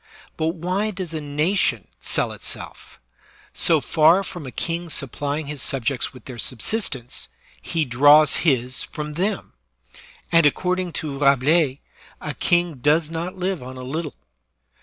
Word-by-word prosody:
But 160 +1 -1
why 185 +5 -1
does 185 -5 -5
a 155 - -3
nation 150 +7 0
sell - - +1
itself? - - -6 0.5
So - - +2
far 165 +5 +4
from 175 -6 -7
a - - -7
king 170 +4 -2
supplying 145 +1 -2
his 145 -1 -5
subjects 130 -1 -1
with 130 -4 -15
their 125 -3 -9
subsistence, 125 - 0 0.3
he 160 - -1
draws 145 +5 +6
his 130 -5 +1
from 150 -1 -6
them; 195 +5 -2 0.8
and, 165 -3 +6
according 180 +3 -1
to 145 -2 -4
Rabelais, 140 +1 +3 0.4
a - - -5
king 175 -3 +1
does 150 +4 +2
not 170 +3 -4
live 185 -2 -2
on 130 +1 -9
a 130 - -7
little. 150 +3 -4
155 Hz, 140 wpm, -22 LUFS, 135-175 Hz, 0.8 s, draws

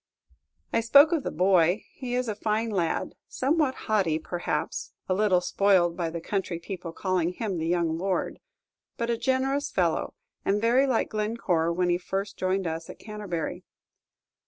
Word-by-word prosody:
I - - +4
spoke 280 +7 +7
of 330 -3 +1
the - - -3
boy; 180 +2 +3
he 245 -2 -4
is 250 0 0
a 215 - -1
fine 220 +2 -1
lad, 175 -5 -1
somewhat 285 0 +1
haughty, 195 -8 +2
perhaps; 175 +2 -3
a 185 - +1
little 190 -2 +3
spoiled 180 -3 +3
by 170 -2 -2
the 170 +1 -5
country 180 0 -2
people 170 0 -6
calling 180 -1 0
him 195 -4 -3
the 160 - -2
young 170 -2 +1
lord; 190 0 -1 0.6
but 235 0 -1
a - - +2
generous 265 +3 0
fellow, 170 -3 0 0.3
and 200 +1 +1
very 240 +5 +3
like 250 -4 +1
Glencore 210 -6 0
when 180 +1 +1
he 175 0 +2
first 195 +2 -3
joined 185 +1 0
us 165 0 -4
at - - -9
Canterbury. 205 -6 -5
195 Hz, 165 wpm, -27 LUFS, 175-225 Hz, 0.6 s, spoke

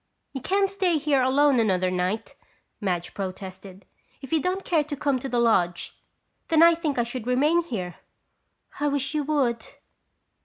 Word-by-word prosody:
"You 270 - -5
can't 390 +7 +2
stay 380 -4 0
here 290 -3 +2
alone 270 +1 +3
another 185 -4 +1
night," 185 +4 -2 0.5
Madge 180 -4 -2
protested. 190 0 -7 0.3
"If 270 +2 -8
you 320 - +3
don't 370 +3 -2
care 320 -4 +2
to 290 0 -5
come 275 -2 0
to 270 - -5
the 245 - -1
lodge, 180 -7 +1 0.5
then 325 -1 +5
I 335 0 +8
think 320 -5 -2
I 240 - +3
should 240 0 -6
remain 295 +7 +3
here." 185 - -5 0.8
"I 295 - +1
wish 280 0 -1
you 300 -1 0
would!" 255 -7 0
260 Hz, 165 wpm, -25 LUFS, 200-305 Hz, 0.8 s, I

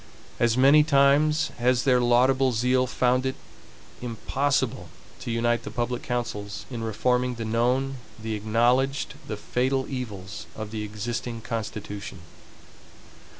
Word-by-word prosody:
As 120 0 +2
many 140 +4 +7
times 150 +2 +3
has 125 0 +2
their 125 -2 +4
laudable 130 +2 +3
zeal 125 +3 +2
found 125 0 +1
it 130 0 -1 0.7
impossible 125 -3 -1 0.3
to 125 - -6
UNITE 120 +1 +1
THE - - -7
PUBLIC 120 0 -2
COUNCILS 110 -4 -4
in 120 -2 -4
reforming 125 +3 0
the 115 -1 -5
known, 125 +4 +1 0.2
the 110 0 -4
acknowledged, 120 +6 +1
the 105 - -4
fatal 130 +5 0
evils 105 -7 -6
of 110 -1 -6
the 110 -1 -4
existing 115 +2 -4
constitution. 105 -4 -5
120 Hz, 125 wpm, -26 LUFS, 110-130 Hz, 0.7 s, many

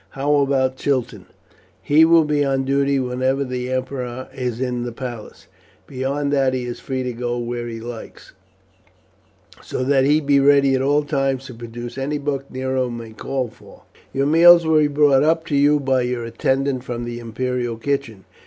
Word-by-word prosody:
How 145 +2 +1
about 135 -2 +1
Chiton?" 125 -9 -2 0.5
"He 155 +2 +4
will 165 0 +5
be 150 -1 +1
on 135 -1 0
duty 140 +1 +1
whenever 130 +1 0
the 125 -1 -4
emperor 130 -1 -4
is 125 -3 -4
in 125 -2 -2
the 120 0 -4
palace; 120 -3 -8 0.4
beyond 140 +2 -2
that 135 -2 +2
he 125 - -2
is 120 -1 -6
free 130 -1 -3
to 125 -1 -3
go 120 +1 -3
where 120 0 -4
he 115 -1 -6
likes, 115 0 -9 1.3
so - - -4
that 135 0 +3
he 150 +2 +4
be 140 -2 +2
ready 140 -1 +4
at 130 - +1
all 145 +2 +2
times 135 -2 -1
to 130 - -9
produce 120 +2 -8
any 145 +3 -2
book 140 -1 -3
that - - -19
Nero 130 -1 -1
may 115 -2 -7
call 130 +3 -3
for. - - -18 0.3
Your 135 +1 0
meals 170 +3 +7
will 160 -1 +4
be 150 - +3
brought 145 -2 +3
up 160 +2 +2
to 150 - -2
you 145 +1 +4
by 130 -2 +1
your 125 -1 -2
attendant 130 +2 -1
from 120 -2 -5
the 120 0 -5
imperial 120 0 -3
kitchen. 115 -6 -3
130 Hz, 185 wpm, -21 LUFS, 125-140 Hz, 1.3 s, meals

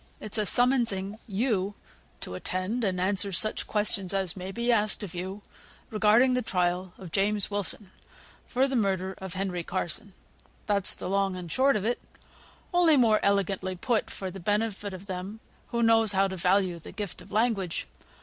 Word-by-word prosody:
It's 215 +1 -2
a 210 - +1
summonsing 225 -5 +2
you 205 -2 0 0.5
to - - -5
attend, 185 - -2
and 185 -3 0
answer 195 +1 +2
such 215 +4 +1
questions 200 -3 +2
as 190 -4 -1
may 185 0 -6
be 235 +4 0
asked 215 -2 +1
of 190 - -7
you 190 +3 -5 0.5
regarding 220 +4 +4
the 250 - +1
trial 180 -3 -1
of 185 -4 -10
James 205 +1 +1
Wilson, 200 -1 0 0.6
for 265 +2 +2
the 270 - -2
murder 190 -4 0
of 190 -1 -6
Henry 185 -2 -2
Carson; 175 +2 -3 0.6
that's 200 -2 +3
the - - -6
long 195 0 +1
and 175 -3 -7
short 270 +1 +3
of 210 -1 -1
it, 240 +2 -1 0.7
only 340 -4 +5
more 225 -4 +4
elegantly 195 -2 0
put, 220 +5 0
for 190 -1 -5
the 195 - -8
benefit 205 +1 -1
of 185 +2 -11
them 190 +3 -6 0.3
who 235 -1 -1
knows 225 -2 +5
how 195 0 +3
to 190 - -5
value 185 -1 +1
the - - -10
gift 200 -2 -6
of - - -15
language. 210 -5 0
200 Hz, 175 wpm, -28 LUFS, 185-220 Hz, 0.7 s, only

